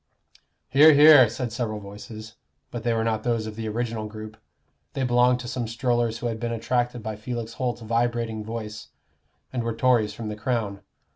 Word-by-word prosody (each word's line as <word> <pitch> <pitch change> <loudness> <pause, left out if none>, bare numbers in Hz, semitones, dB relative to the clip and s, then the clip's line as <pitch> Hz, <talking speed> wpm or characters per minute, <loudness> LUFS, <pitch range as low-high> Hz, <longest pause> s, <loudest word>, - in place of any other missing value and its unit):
"Hear, 150 +4 +7
hear," 145 -4 +8
said 120 0 -4
several 115 -3 -3
voices, 105 +2 -10 0.4
but 120 - -5
they 120 - 0
were 115 -1 +1
not 110 -1 0
those 115 -2 -1
of 110 -1 -7
the 110 0 -4
original 115 -1 -3
group; 110 0 -9 0.6
they 135 - -2
belonged 125 0 +3
to 120 - -7
some 120 -1 -3
strollers 120 -1 0
who - - -7
had 115 -2 -2
been 120 0 -3
attracted 120 +1 -1
by 110 0 -4
Felix 115 +1 -5
Holt's 120 -2 -3
vibrating 115 -1 -1
voice, 110 -1 -6 0.7
and 125 - -1
were 115 -1 -2
Tories 115 -4 +2
from 110 -1 -5
the 105 - -4
Crown. 110 -3 -2
115 Hz, 185 wpm, -25 LUFS, 110-120 Hz, 0.7 s, hear